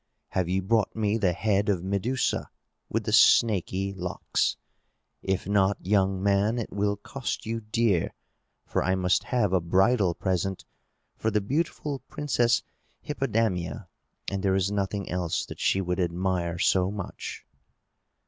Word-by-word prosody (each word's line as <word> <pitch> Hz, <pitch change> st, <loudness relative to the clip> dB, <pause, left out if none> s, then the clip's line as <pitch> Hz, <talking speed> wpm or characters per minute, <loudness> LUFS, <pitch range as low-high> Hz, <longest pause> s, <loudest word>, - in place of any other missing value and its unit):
"Have 90 Hz, -2 st, -1 dB
you 95 Hz, +1 st, 0 dB
brought 110 Hz, +1 st, +1 dB
me 110 Hz, 0 st, +1 dB
the 95 Hz, -4 st, +3 dB
head 105 Hz, +1 st, +1 dB
of 90 Hz, -4 st, +1 dB
Medusa 100 Hz, +7 st, -1 dB, 0.4 s
with -, -, -1 dB
the -, -, -2 dB
snaky 100 Hz, -3 st, +4 dB
locks? 90 Hz, -2 st, -1 dB, 0.6 s
If 95 Hz, -1 st, -1 dB
not, 100 Hz, 0 st, +2 dB
young 95 Hz, -1 st, +2 dB
man, 100 Hz, +3 st, +2 dB
it 115 Hz, -, -4 dB
will 100 Hz, +1 st, +1 dB
cost 130 Hz, +5 st, -5 dB
you 115 Hz, +1 st, -2 dB
dear; 105 Hz, -4 st, +1 dB, 0.5 s
for -, -, 0 dB
I 95 Hz, 0 st, +2 dB
must 90 Hz, -1 st, +1 dB
have 110 Hz, -7 st, +1 dB
a 95 Hz, -, +3 dB
bridal 95 Hz, +2 st, +3 dB
present 95 Hz, 0 st, -2 dB, 0.5 s
for 110 Hz, -, -1 dB
the 105 Hz, -1 st, +2 dB
beautiful 145 Hz, +4 st, -2 dB
Princess 120 Hz, -5 st, +1 dB, 0.4 s
Hippodamia, 100 Hz, -3 st, -1 dB, 0.4 s
and 100 Hz, -1 st, -2 dB
there 95 Hz, -1 st, +2 dB
is 95 Hz, +1 st, +1 dB
nothing 100 Hz, 0 st, -2 dB
else 90 Hz, -2 st, -1 dB
that -, -, -10 dB
she 95 Hz, -, +2 dB
would 90 Hz, 0 st, -2 dB
admire 90 Hz, -1 st, -1 dB
so 95 Hz, +1 st, +3 dB
much." 100 Hz, -2 st, -6 dB
100 Hz, 145 wpm, -27 LUFS, 95-110 Hz, 0.6 s, snaky